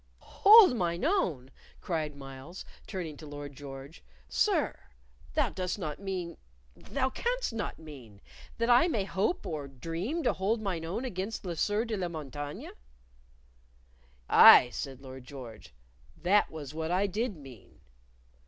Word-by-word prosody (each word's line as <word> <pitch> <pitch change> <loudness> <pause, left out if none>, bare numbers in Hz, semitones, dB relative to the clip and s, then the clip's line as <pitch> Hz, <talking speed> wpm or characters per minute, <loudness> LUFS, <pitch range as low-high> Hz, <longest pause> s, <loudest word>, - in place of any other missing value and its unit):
"Hold 410 - +9
mine 175 +2 -1
own?" 165 - 0 0.3
cried 155 -4 -3
Myles, 135 +5 -10 0.2
turning 170 -7 -5
to 155 - -11
Lord 145 -1 -8
George. 135 +2 -10 0.3
"Sir; 70 - +1 0.6
thou - - +2
dost 185 0 -3
not 155 -7 -5
mean 185 -3 -4 0.4
thou 265 -1 -2
canst - - -2
not 220 -2 -4
mean, 130 -10 -12 0.4
that 230 - 0
I 245 +7 +6
may 225 - 0
hope 195 - -1
or 150 -4 -4
dream 165 - -4
to 250 - +2
hold 205 +5 0
mine 185 -6 -3
own 200 +10 -3
against 205 -1 -4
the 175 -3 -4
Sieur 210 +7 0
de 225 -2 -3
la 180 -2 -2
Montaigne." 145 -3 -6 1.6
"Aye," 125 - +9
said 135 0 -6
Lord 130 -1 -10
George, 125 -4 -11 0.5
"that 200 +4 +3
was 150 -3 -8
what 160 0 -3
I 185 +3 +2
did 210 +1 -2
mean." 120 - -15
170 Hz, 145 wpm, -30 LUFS, 145-210 Hz, 1.6 s, Hold